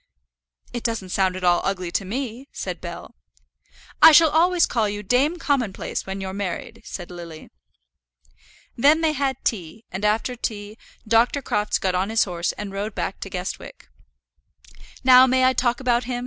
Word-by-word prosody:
"It 240 - -4
doesn't 225 -5 -3
sound 185 0 +1
at 185 - -7
all 175 -1 +3
ugly 185 -3 -2
to 195 - -1
me," 245 +5 -5
said - - -6
Bell. - - -8 0.9
"I - - +10
shall 315 0 +6
always 345 +2 +3
call 220 -3 0
you 205 0 -5
Dame 270 - +1
Commonplace 260 - -2
when 190 +1 -4
you're 190 -1 -5
married," 195 -3 -5
said 175 -1 -8
Lily. 170 -3 -10 1.2
Then 295 +6 +4
they 320 -1 +2
had 275 -3 -1
tea, 215 -1 -3
and 190 +2 -5
after 215 +4 0
tea 210 -3 -5 0.3
Dr. 235 +5 +2
Crofts 210 -2 0
got 190 -1 -1
on 185 +3 0
his 225 0 +3
horse 175 -2 -2
and 200 -2 -7
rode 200 +1 -4
back 195 - -3
to 195 - -7
Guestwick. 180 - -7 1.1
"Now 255 0 +8
may 260 0 +3
I 260 - +4
talk 240 -2 0
about 245 -2 +1
him?" 245 0 -3
220 Hz, 170 wpm, -23 LUFS, 190-255 Hz, 1.2 s, I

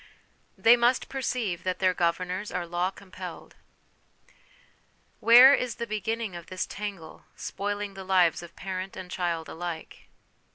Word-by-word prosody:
They 230 +2 +7
must 240 +1 +2
perceive 245 -9 -2
that 185 -1 -2
their 185 -1 +2
Governors 180 +3 -1
are 180 -1 -2
Law 175 +2 -1
compelled. 185 -3 -10 1.7
Where 245 +4 +9
is 250 -4 0
the 235 - -4
beginning 220 -1 -3
of 170 -1 -9
this 185 - -3
tangle, 200 -6 -7
spoiling 205 0 -4
the 195 0 -8
lives 185 -3 +3
of 175 -1 -12
parent 190 0 -5
and 185 -1 -8
child 170 -3 -2
alike? 165 - -7
185 Hz, 135 wpm, -27 LUFS, 175-215 Hz, 1.7 s, Where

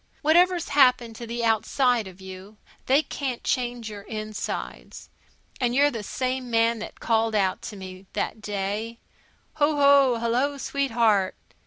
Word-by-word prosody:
Whatever's 345 +3 +3
happened 250 -5 +3
to 235 - -7
the 235 0 -2
outside 225 +1 +1
of 185 0 -13
you, 190 +2 -11 0.3
they 275 +4 +4
can't 265 -6 -4
change 245 -2 -2
your 210 -2 -7
insides. 215 0 -6 0.5
And 245 -2 0
you're 290 +2 +4
the 230 - -5
same 255 +3 -3
man 230 0 +2
that 220 - -8
called 225 -1 +1
out 190 -3 +1
to 210 - -9
me, 185 0 -10
that 220 - -3
day, 210 +3 -3 0.6
"Hoo 295 +1 +3
hoo! 280 -4 +5
Hello, 250 +5 0
sweetheart!" 230 -9 +1
235 Hz, 145 wpm, -25 LUFS, 215-265 Hz, 0.6 s, hoo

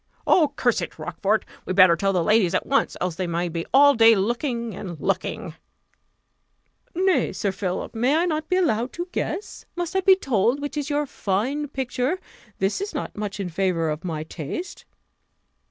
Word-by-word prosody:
"Oh, 305 -5 +4
curse 245 -4 +1
it! - - -6
Rochfort, 215 +2 -1 0.2
we'd 185 - -3
better 185 -3 +7
tell 195 +4 0
the 180 -3 +1
ladies 210 -2 +3
at - - 0
once, 275 - +1
else 180 -1 -1
they 185 -1 -2
may 170 +1 -1
be 165 0 -4
all 285 +2 +7
day 225 -1 +6
looking 235 +2 -1
and 175 -4 -7
looking!" - - -2 1.4
"Nay, 375 +1 +2
Sir 200 - -1
Philip, 190 -1 -4
may 270 +9 +2
not 310 -3 -1
I - - -42
be 365 - +2
allowed 255 -9 +1
to 345 +1 -4
guess? 410 - -4
Must 350 +1 -4
I - - +4
be 380 0 +6
told 250 - +1
which 290 +1 -5
is 295 0 -3
your 295 0 0
fine 260 +6 -2
picture? 265 +4 -2 0.4
This 195 - 0
is 400 -4 -4
not 290 - -4
much 205 -1 -4
in 190 -3 -3
favour 170 -2 0
of 150 +2 -5
my 160 -4 -3
taste." 160 - -6
230 Hz, 185 wpm, -24 LUFS, 185-295 Hz, 1.4 s, better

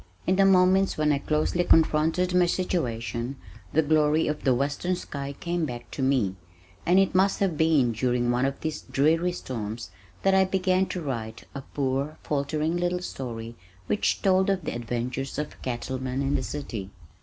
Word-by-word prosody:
In 185 - +2
the 195 0 +5
moments 190 +1 +4
when 155 -1 +2
I 140 - +1
closely 155 +4 0
confronted 165 +3 +3
my 180 -1 +4
situation 125 -8 -2 0.4
the 160 - +3
glory 155 +1 +3
of 150 0 -2
the 130 -3 +3
western 145 +7 -1
sky 140 -5 -6
came 175 -1 -1
back 120 -2 -8
to - - -5
me, 125 -8 +1 0.5
and 180 +2 +5
it 195 0 +3
must 190 +2 +3
have 190 -5 +1
been 150 -6 +3
during 120 +1 0
one 125 +2 +1
of 135 - -4
these 155 -1 -3
dreary 165 +5 +2
storms 115 -8 -5 0.3
that 195 - +4
I 190 0 +6
began 185 0 +1
to 180 - -4
write 115 -6 -4
a 140 - -5
poor 140 +2 -2
faltering 150 +3 -1
little 175 0 -1
story 115 -6 -6 0.3
which 210 - 0
told 190 -1 +3
of 190 -4 0
the - - -2
adventures 120 +3 -3
of 150 0 -3
a - - -20
cattleman 130 +1 -3
in 140 +1 0
the - - +1
city. 120 -8 -5
150 Hz, 180 wpm, -26 LUFS, 130-180 Hz, 0.5 s, I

